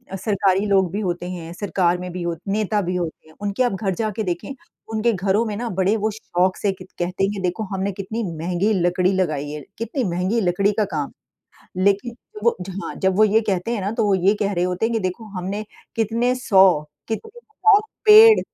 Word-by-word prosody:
सरकारी 195 0 +1
लोग 190 -4 +2
भी 205 - -2
होते 175 -2 -3
हैं, 170 -2 -7
सरकार 180 -2 0
में 180 0 -6
भी 180 0 -5
हो 170 -1 -2
नेता 210 +1 0
भी 180 -1 -2
होते 170 -3 -4
हैं। 155 - -19
उनके 205 +4 0
आप 245 - +1
घर 190 0 -1
जाके 215 0 -2
देखें, 175 +8 -3 0.4
उनके 225 +2 +2
घरों 195 +3 +1
में 215 -2 -3
ना 240 +1 -3
बड़े 190 +3 +3
वो 215 +1 0
शौक 185 -3 -1
से 200 - 0
क 185 -1 -10 0.2
कहते 180 +2 -1
हैं 195 - +2
कि 200 - -5
देखो 180 +4 -1
हमने 195 +1 -1
कितनी 200 +4 -4
महँगी 180 +6 0
लकड़ी 180 0 +2
लगाई 155 -6 -1
है, 150 0 -6 0.2
कितनी 235 +4 -2
महँगी 185 +6 0
लकड़ी 195 +2 +2
का 215 - +3
काम 145 -2 -1 0.5
है। 185 +1 -5
लेकिन 200 +4 +1 0.3
वो 235 - +3
जहाँ 190 +2 -6
जब 190 -1 +2
वो 215 - +6
ये 215 +1 +4
कहते 190 +2 -1
हैं 215 - -2
ना, 195 +1 -2
तो 225 -1 0
वो 200 - +3
ये 190 +3 +3
कह 205 0 +1
रहे 175 -2 0
होते 180 +4 0
हैं 235 - -2
कि 225 - +1
देखो 185 +4 -3
हमने 195 +4 -4 0.3
कितने 230 +3 +1
100 190 -9 +4 0.3
कितने 435 - -5
हज़ार 430 -2 +3 0.3
पेड़ 435 +1 +9
195 Hz, 215 wpm, -22 LUFS, 180-220 Hz, 0.5 s, पेड़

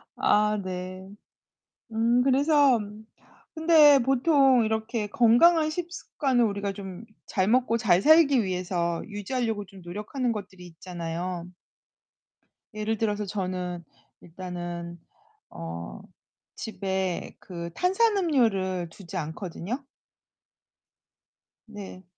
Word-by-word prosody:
아 210 0 +2
네. 185 +1 -6 0.8
음. 235 +2 +2
그래서 275 -1 +4 0.8
근데 315 -3 +6
보통 265 -1 +3
이렇게 220 0 -2
건강한 305 +9 +4
식습관을 310 -7 -1
우리가 200 -2 -2
좀 195 0 -8 0.2
잘 190 0 0
먹고 235 0 +2
잘 190 -5 +3
살기 290 -5 +5
위해서 180 -2 -2
유지하려고 220 +1 -3
좀 195 0 -15
노력하는 210 +8 -3
것들이 190 -4 -8
있잖아요. 175 0 -5 1.3
예를 215 +1 -2
들어서 210 -1 -1
저는 180 -3 -4 0.4
일단은 175 -1 -7 0.5
어 85 -6 -7 0.6
집에 190 -4 -3
그 170 -3 -7
탄산음료를 270 - +1
두지 185 +2 -9
않거든요. 180 - -5 1.8
네. 205 -4 -10
205 Hz, 205 characters per minute, -26 LUFS, 180-255 Hz, 1.8 s, 근데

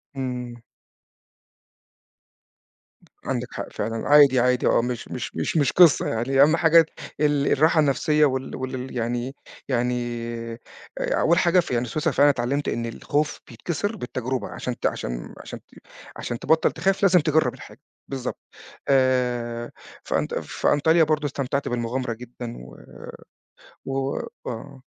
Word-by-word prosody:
إمم. 125 -2 -5 2.6
عندك - - -2
حق - - -6
فعلًا. 115 +2 -3
عادي، 145 -3 +7
عادي، 125 +1 +2
آه، - - +4
مش 120 -1 -4
مش - - -6
مش - - -1
مش 145 -4 +3
قصة 175 -4 +5
يعني، 130 +4 +1
أهم 155 +3 +6
حاجة 165 0 +6 0.3
ال 145 -1 +2
الراحة 160 +3 +4
النفسية 150 +1 +3
وال 130 -1 -2
والل 130 0 -5
يعني 120 +3 -2 0.3
يعني، 120 -2 -2 0.4
أول 170 +1 +2
حاجة 180 0 +4
في 165 - -2
يعني 120 0 +1
سويسرا 150 +6 -1
فعلًا 145 +1 +5
اتعلمت 140 +2 -1
إن 115 - -2
الخوف 145 +6 -2
بيتكسر 170 - -3
بالتجربة، 130 - -4
عشان 125 -1 -5
ت - - -5
عشان - - -3
عشان - - -8
ت - - -36 0.5
عشان 120 - -4
تبطل 160 0 +2
تخاف 195 +4 0
لازم 185 -2 +6
تجرب 155 0 +2
الحاجة، - - -13 0.3
بالضبط. 130 -2 -5 0.5
آآ، 125 -3 +1 0.3
في - - 0
أنط - - -2
في - - -2
أنطاليا 160 +3 +4
برضو 150 -1 0
استمتعت 140 0 -2
بالمغامرة 120 +1 -2
جدًا 120 0 -8
و 60 +1 -12 1.1
و 135 0 -2 0.3
آه. 120 +3 -8
130 Hz, 135 wpm, -24 LUFS, 120-150 Hz, 2.6 s, عادي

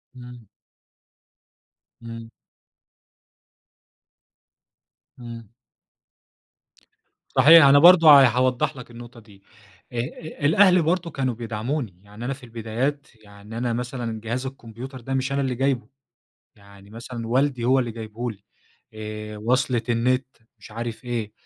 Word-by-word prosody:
إمم. 125 -2 -12 1.6
إمم. 115 0 -9 2.9
إمم. 115 -3 -10 1.9
صحيح 160 -1 +8
أنا 140 +1 +7
برضه 170 0 +7
ه 130 - +7
هاوضح 125 +4 0
لك 125 -1 -11
النقطة 120 0 -12
دي. 100 -3 -20 0.5
آآ، - - -6
آآ 145 +5 -5
الأهل 185 +3 +5
برضه 170 +1 -1
كانوا 130 -3 -2
بيدعموني. 115 - -4
يعني 105 +4 -10
أنا 135 - -2
في 130 - -14
البدايات، 120 +5 -3 0.2
يعني 100 +2 -12
أنا 120 -1 -1
مثلًا 120 -2 -4
جهاز 120 +4 -4
الكمبيوتر 130 0 -9
ده 135 +3 -5
مش 130 0 -1
أنا 140 0 0
اللي 130 -2 -2
جايبه، 130 -3 -1 0.7
يعني 100 0 -18
مثلًا 115 0 -8
والدي 130 0 0
هو 130 +2 +3
اللي 120 -2 -1
جايبه 115 +2 -6
لي 100 -1 -13 0.5
آآ، 105 0 -7
وصْلة 120 +2 0
النت 125 +2 +1 0.3
مش - - -14
عارف 115 +2 -6
إيه، 115 -4 -4
120 Hz, 125 wpm, -23 LUFS, 115-135 Hz, 2.9 s, صحيح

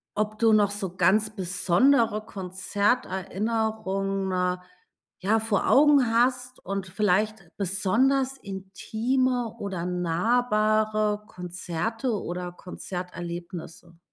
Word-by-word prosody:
ob 215 0 -2
du 225 -1 +5
noch 205 -2 +4
so 195 -3 -4
ganz 215 +4 +3
besondere 215 +4 +2
Konzerterinnerungen 195 -1 -1 0.6
ja, 215 +4 +2
vor 220 -2 0
Augen 285 -2 +6
hast 250 +1 +1
und 195 0 -3
vielleicht 210 0 0
besonders 255 +8 +1
intime 225 +5 -2
oder 190 -4 -4
nahbare 215 +3 +1
Konzerte 180 +7 -3
oder 180 -3 -3
Konzerterlebnisse? 175 -2 -7
205 Hz, 85 wpm, -26 LUFS, 185-225 Hz, 0.6 s, Augen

